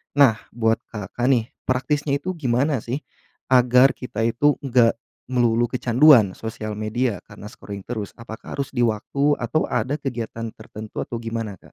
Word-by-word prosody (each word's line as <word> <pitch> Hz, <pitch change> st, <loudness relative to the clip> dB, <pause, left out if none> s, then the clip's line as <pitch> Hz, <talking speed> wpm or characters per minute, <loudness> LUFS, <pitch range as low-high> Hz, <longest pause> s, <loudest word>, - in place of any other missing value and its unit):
Nah, 130 Hz, -7 st, +5 dB, 0.2 s
buat 115 Hz, -1 st, +2 dB, 0.2 s
Kakak 115 Hz, +4 st, -3 dB
nih, 120 Hz, -3 st, +2 dB, 0.2 s
praktisnya 140 Hz, +3 st, 0 dB
itu 185 Hz, +6 st, -4 dB
gimana 130 Hz, +1 st, +1 dB
sih, 125 Hz, +7 st, -4 dB, 0.5 s
agar 125 Hz, +1 st, +6 dB
kita 115 Hz, -3 st, -5 dB
itu 125 Hz, +5 st, +3 dB
enggak 125 Hz, -3 st, +3 dB, 0.4 s
melulu 120 Hz, -1 st, +2 dB
kecanduan 125 Hz, -4 st, +5 dB
sosial 110 Hz, -1 st, -5 dB
media 110 Hz, 0 st, -2 dB
karena 105 Hz, -, -11 dB
scrolling 100 Hz, -2 st, -9 dB
terus. 110 Hz, -4 st, -4 dB
Apakah 110 Hz, -1 st, -9 dB
harus 140 Hz, -, -1 dB
di 120 Hz, -, +2 dB
waktu 140 Hz, +7 st, +1 dB
atau 125 Hz, +6 st, 0 dB
ada 125 Hz, +4 st, 0 dB
kegiatan 115 Hz, -5 st, -5 dB
tertentu 110 Hz, 0 st, -9 dB
atau 120 Hz, -, -4 dB
gimana, 115 Hz, -3 st, -4 dB
Kak? -, -, -27 dB
120 Hz, 155 wpm, -23 LUFS, 110-130 Hz, 0.5 s, agar